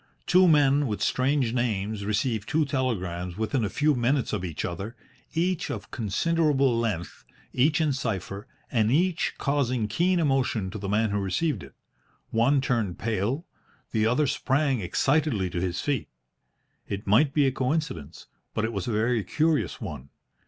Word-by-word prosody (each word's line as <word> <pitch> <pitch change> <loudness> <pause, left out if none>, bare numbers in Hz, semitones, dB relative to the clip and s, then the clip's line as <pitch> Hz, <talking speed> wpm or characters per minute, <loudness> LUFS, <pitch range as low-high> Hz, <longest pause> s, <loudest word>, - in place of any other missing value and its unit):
Two 185 +1 +5
men 145 -2 +4
with 105 -3 -2
strange 130 -2 +1
names 110 -4 -1
receive 105 +1 -1
two 155 0 +2
telegrams 95 - -2
within 110 +3 0
a 105 - 0
few 150 +8 +2
minutes 125 +1 0
of - - -1
each 85 -5 -3
other, 95 +7 -5 0.4
each 175 +1 0
of - - -6
considerable 140 - +1
length, 110 -8 -3 0.3
each 150 +5 +3
in 155 -3 +2
cipher, 105 -3 -4 0.2
and 110 -3 +2
each 170 +4 +1
causing 130 -5 0
keen 175 - +2
emotion 135 - +1
to 105 - -6
the 100 0 -4
man 105 +1 +1
who 100 - 0
received 100 - -1
it. 70 - -12 0.6
One 130 +5 +3
turned 115 -9 -1
pale. 115 - -1 0.5
The 110 -1 +2
other 125 +6 +2
sprang 135 0 +1
excitedly 110 - +1
to 85 - -2
his 90 -1 -2
feet. 140 -5 -1 0.8
It 100 +1 -4
might 120 +9 +4
be 145 0 +3
a 135 - +3
coincidence, 130 - -3 0.3
but 110 - +1
it 115 - -3
was 100 -4 -3
a - - 0
very 110 +1 +1
curious 155 +3 0
one. 75 - -7
120 Hz, 160 wpm, -26 LUFS, 105-145 Hz, 0.8 s, Two